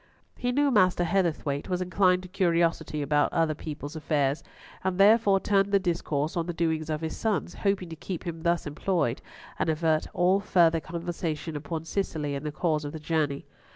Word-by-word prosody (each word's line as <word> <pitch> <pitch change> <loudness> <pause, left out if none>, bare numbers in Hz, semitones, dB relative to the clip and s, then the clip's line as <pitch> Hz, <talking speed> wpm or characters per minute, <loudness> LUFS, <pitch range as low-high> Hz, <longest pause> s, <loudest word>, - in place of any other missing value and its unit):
He 245 0 -1
knew 285 +2 +2
Master 185 -6 +4
Heatherthwayte 165 -6 0
was 180 -1 0
inclined 185 0 +2
to - - -8
curiosity 170 -5 +1
about 145 +1 +2
other 165 -2 +1
people's 150 0 -7
affairs, 145 -2 0 0.4
and 190 -1 -1
therefore 200 0 +5
turned 200 0 +2
the 200 - +5
discourse 165 -5 -1
on 170 -1 -1
the 175 - -4
doings 160 -2 -1
of 155 0 -2
his 160 -1 -3
sons, 215 -5 -1
hoping 195 -3 -1
to 165 - -7
keep 175 +2 -6
him 165 -2 -5
thus 170 0 +1
employed 150 -4 -1 0.4
and - - +1
avert 155 0 +1
all 185 +3 +3
further 170 -5 +3
conversation 165 -1 -4
upon 160 +2 -4
Cicely 160 -6 -2
and 140 +2 -4
the - - -2
cause 155 -1 0
of 145 +1 -5
the 160 - -6
journey. 150 -2 -1
165 Hz, 185 wpm, -27 LUFS, 155-185 Hz, 0.4 s, therefore